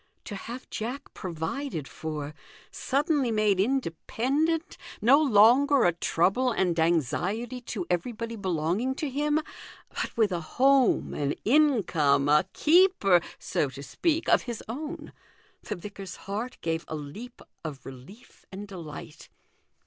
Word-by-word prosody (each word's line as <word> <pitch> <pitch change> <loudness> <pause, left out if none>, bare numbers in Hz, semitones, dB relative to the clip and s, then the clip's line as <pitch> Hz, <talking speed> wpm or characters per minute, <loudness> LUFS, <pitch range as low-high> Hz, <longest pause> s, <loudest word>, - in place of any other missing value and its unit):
To 205 - -6
have 240 +6 -8
Jack 245 +6 -5
provided 165 - -4
for, 150 -2 -5 0.4
suddenly 280 -1 0
made 215 -3 +2
independent, 270 - 0 0.2
no 270 +7 +5
longer 265 +2 +5
a 175 - +5
trouble 190 +9 +1
and 190 -5 +1
THE 165 -1 0
GOLDEN 165 +2 +4
RULE. 165 - +3
287 175 - -2
anxiety 250 +1 -7
to 215 -6 -5
everybody 230 +6 -2
belonging 190 +6 -1
to 300 - -3
him, 295 +3 +1 0.5
but - - -5
with 220 -3 +3
a 175 -2 -2
home, 265 +8 +3
an 145 0 -1
income, 190 - +3
a 150 +5 +4
keeper 315 - +4 0.2
(so 145 - -1
to 135 +2 -9
speak) 325 - -1
of - - +5
his 240 -3 -6
own! 300 +6 -6 0.5
The - - -5
vicar's 195 0 -8
heart 215 +6 -4
gave 165 0 -1
a 155 - -4
leap 155 - -8 0.2
of 150 -4 -7
relief 135 - -13
and 200 +2 -7
delight. 165 -4 -9
210 Hz, 140 wpm, -27 LUFS, 165-265 Hz, 0.5 s, no